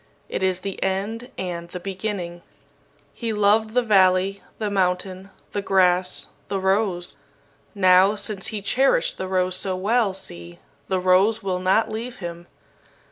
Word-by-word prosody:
It - - -3
is 185 -1 +1
the 195 -1 -5
end 205 +6 -2
and 170 -2 -4
the 180 - -6
beginning. 185 -2 -4 0.7
"He 230 -2 -3
loved 215 +2 +2
the 250 - +4
valley, 195 -2 +3 0.2
the 210 -2 -2
mountain, 185 0 -1 0.2
the 205 - -2
grass, 185 -2 +2 0.2
the 195 - -2
rose. 190 -2 0 0.6
Now, 185 +1 +5
since 205 -2 -3
he 210 -2 -4
cherished 255 -6 +2
the 190 - -3
rose 185 -1 0
so 185 0 -2
well, 205 +1 +1
see, 85 - -8 0.3
the 190 -1 0
rose 185 +4 +3
will 185 -2 -1
not 190 +4 +2
leave 235 +3 -5
him. 170 -1 -7
190 Hz, 145 wpm, -23 LUFS, 185-210 Hz, 0.7 s, Now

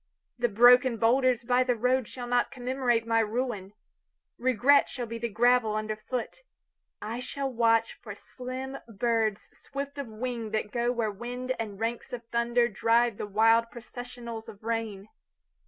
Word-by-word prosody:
The 240 - +3
broken 245 +3 +6
boulders 250 +2 +3
by 250 +1 +3
the 250 -1 +1
roadShall 250 +1 -1
not 245 0 +2
commemorate 250 -2 0
my 225 0 +2
ruin. 220 -3 -2 0.7
Regret 255 +3 +4
shall 245 -2 -4
be 230 0 -6
the 235 0 -2
gravel 230 0 +3
under 215 0 -2
foot.I 235 - -8
shall 270 +1 -4
watch 230 -1 +2
forSlim 255 +5 -7 0.2
birds 225 -2 0
swift 280 +1 -7
of 280 - -4
wingThat 220 -2 -3
go 240 0 0
where 230 -3 -1
wind 245 +4 -4
and 210 -3 -5
ranks 235 +3 -3
of 240 -1 -5
thunderDrive 235 -1 +2
the - - -4
wild 225 +3 +4
processionals 240 -1 -8
of 205 +1 -13
rain. 220 -3 -3
235 Hz, 140 wpm, -28 LUFS, 225-250 Hz, 0.7 s, broken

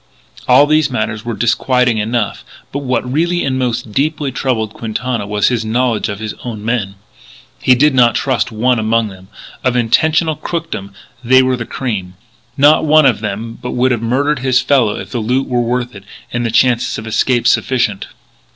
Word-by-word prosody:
All 130 +3 +6
these 155 -1 +2
matters 110 -3 -3
were 120 -1 -4
disquieting 125 0 +1
enough: 110 0 -2 0.3
but 140 - -3
what 125 -3 -2
really 170 +6 0
and 130 -1 -1
most 120 -3 -2
deeply 145 +3 -1
troubled 115 -5 -2
Quintana 115 -1 -3
was 105 0 +1
his 120 -3 -1
knowledge 115 0 0
of 100 - -4
his 110 0 -5
own 110 -4 -6
men. 110 -5 -2 0.7
He 130 - +5
did 145 +3 +3
not 120 -3 +4
trust 130 -2 0
one 120 +2 +1
among 110 0 +1
them. 95 -1 -14 0.4
Of 125 -1 +1
international 155 +7 +2
crookdom 165 - -5 0.3
they 130 +2 +5
were 130 0 +1
the 120 -2 -6
cream. 95 -8 -4 0.4
Not 145 +2 +5
one 155 -1 +5
of 130 -5 +3
them 110 +2 -5
but 125 - -5
would 130 +1 +2
have 120 -3 -1
murdered 135 +5 0
his 130 0 +2
fellow 125 -6 +2
if - - -8
the 120 - -2
loot 125 +5 0
were 125 -1 0
worth 120 +1 -2
it 100 -1 -11 0.3
and 120 0 -1
the 115 - -1
chances 120 +1 +2
of 110 - -7
escape 120 +2 0
sufficient. 115 -6 +1
120 Hz, 185 wpm, -15 LUFS, 110-130 Hz, 0.7 s, All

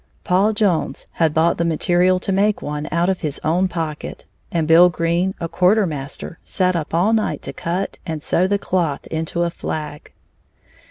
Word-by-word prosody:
Paul 195 +4 +2
Jones 205 -6 0
had 165 -2 +1
bought 160 +3 +2
the - - +2
material 175 +3 +2
to 195 - -2
make 200 +2 +1
one, 150 +1 -4
out 170 +1 +1
of 190 -1 0
his 150 -3 -3
own 175 +4 +2
pocket, 165 -4 -5 0.3
and 165 -2 0
Bill 170 +2 +7
Green, 170 +2 0
a 170 - -2
quarter 195 +5 +3
master, 150 +1 -6
sat 185 -1 0
up 160 -3 -3
all 180 +7 +2
night 220 -1 0
to - - -5
cut 180 +4 -3
and 160 -2 -5
sew 185 - +2
the 200 +1 +1
cloth 175 -7 -1
into 165 +2 -1
a 170 - -1
flag. 150 -3 -6
170 Hz, 180 wpm, -20 LUFS, 160-185 Hz, 0.3 s, Bill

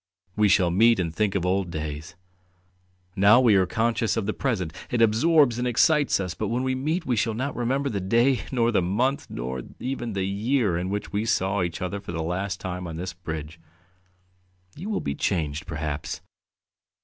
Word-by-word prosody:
We 105 -1 +3
shall 90 -2 +4
meet 115 +4 +4
and 85 -3 -1
think 100 +3 0
of 90 -2 0
old 95 0 0
days.... 75 0 -5 1.0
Now 100 +4 +6
we 120 -4 +5
are 95 -2 +4
conscious 115 +1 0
of 110 - -1
the 110 - -1
present; 95 - -2 0.2
it 120 - -1
absorbs 120 +3 +4
and 125 - 0
excites 145 +4 +3
us, 90 -3 -3
but 85 - -3
when 120 +3 -1
we 130 0 0
meet 155 +7 -1
we 125 - +1
shall 110 0 0
not 135 +5 -3
remember 135 +4 0
the 105 -7 -2
day, 120 +7 +3
nor 120 -3 +2
the 105 - +2
month, 120 +10 0
nor 65 +1 -4 0.2
even 120 -3 -3
the 95 -1 -1
year 105 +1 +1
in 90 +2 -2
which 105 +1 -4
we 105 +1 0
saw 95 -2 +1
each 85 +1 -3
other 90 +2 -3
for 95 -3 -8
the 80 -1 -2
last 95 +4 -2
time 90 -1 -5
on 80 - -6
this 90 +2 -5
bridge. 80 -2 -7 1.2
You 185 +8 -6
will 215 - -1
be 70 - -2
changed, 75 0 -2
perhaps 75 -3 -4
100 Hz, 195 wpm, -25 LUFS, 90-120 Hz, 1.2 s, Now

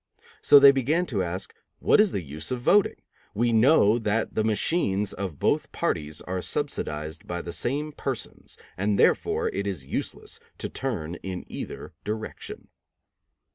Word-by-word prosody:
So 145 - +8
they 140 0 +9
began 140 +7 +1
to 110 - -1
ask: 90 +2 -4 0.2
"What - - +5
is 210 -3 +3
the 95 - -3
use 75 +2 -7
of 125 - -2
voting? 200 +11 +3 0.4
We 120 +2 +2
know 115 -2 +5
that 110 0 0
the 110 - +1
machines 105 - +1
of 95 -7 -5
both - - 0
parties 75 +2 -2
are 90 0 -3
subsidized 75 0 -3
by 85 0 -4
the 85 - -6
same 145 +5 -1
persons, 135 -4 -5 0.2
and 100 +2 +1
therefore - - +2
it 100 0 -3
is 90 -10 -4
useless - - -5 0.2
to - - -4
turn 90 -11 -3
in 95 -2 -5
either - - -7
direction." 110 +1 -6
105 Hz, 155 wpm, -26 LUFS, 90-130 Hz, 0.4 s, they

